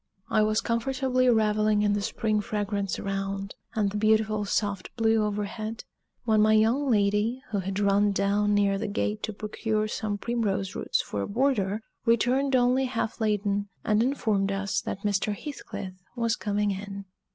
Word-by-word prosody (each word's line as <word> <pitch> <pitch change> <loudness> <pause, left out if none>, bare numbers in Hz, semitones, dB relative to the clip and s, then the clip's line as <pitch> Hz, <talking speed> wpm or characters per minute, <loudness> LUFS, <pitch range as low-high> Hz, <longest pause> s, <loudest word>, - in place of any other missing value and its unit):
I 215 - +4
was 215 0 +2
comfortably 255 +2 +1
reveling 215 -2 +3
in 205 -1 +3
the 205 - 0
spring 215 0 0
fragrance 205 -2 -2
around, 195 0 -3 0.2
and 205 -3 +1
the 210 - -3
beautiful 215 0 +2
soft 200 -2 -1
blue 225 -1 +3
overhead, 210 +2 -3 0.4
when 220 -2 +3
my 215 0 +5
young 230 +6 +3
lady, 210 +3 +1
who 205 - 0
had 190 +1 -3
run 200 0 +3
down 205 +1 +1
near 200 -1 +2
the 220 - -2
gate 210 +1 -2
to 215 - -3
procure 215 +1 -2
some 215 -1 -3
primrose 200 -4 -1
roots - - -1
for 100 - -4
a - - -2
border, 220 -4 +1 0.2
returned 250 +4 +2
only 250 +1 +3
half 235 -2 -3
laden, 205 -1 0
and 215 0 +2
informed 220 -6 +1
us 195 0 -1
that 195 - -5
Mr. 205 0 0
Heathcliff 240 -10 -7 0.2
was 230 -2 +1
coming 205 0 0
in. 200 0 -6
210 Hz, 165 wpm, -27 LUFS, 200-225 Hz, 0.4 s, my